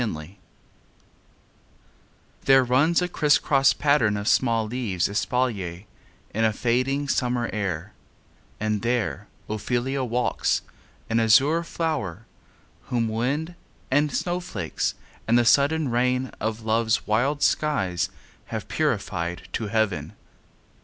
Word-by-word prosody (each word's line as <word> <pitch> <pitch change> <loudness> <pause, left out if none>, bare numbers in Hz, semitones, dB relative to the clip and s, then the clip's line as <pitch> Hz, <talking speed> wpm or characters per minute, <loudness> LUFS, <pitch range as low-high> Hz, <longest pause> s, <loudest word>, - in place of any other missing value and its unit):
OPHELIA 85 -3 -5 2.1
There 135 -1 +6
runs 145 +8 +3
a - - 0
crisscross 145 -4 +3
pattern 140 -8 +2
of 100 +1 -4
small 115 -3 +2
leaves 110 -6 -1
Espalier, 100 -4 -1 0.5
in 110 - 0
a 110 - +4
fading 130 +6 0
summer 125 -3 0
air, 100 -3 -3 0.7
And 105 -1 -1
there 115 -3 -1 0.2
Ophelia 125 +5 -1
walks, 125 0 0 0.4
an 115 0 +1
azure 140 +9 +4
flower, 145 - -3 0.6
Whom 115 -2 0
wind, 140 +10 -1 0.4
and 145 +2 +3
snowflakes, 175 - -2 0.3
and 115 +2 +4
the 120 - +3
sudden 145 +5 +3
rain 125 +2 +1
Of 110 +1 -3
love's 110 0 +1
wild 135 +7 +1
skies 95 - +1 0.4
have - - -5
purified 85 +1 -2
to 110 - -2
heaven. 100 -8 -1
120 Hz, 110 wpm, -25 LUFS, 105-135 Hz, 2.1 s, There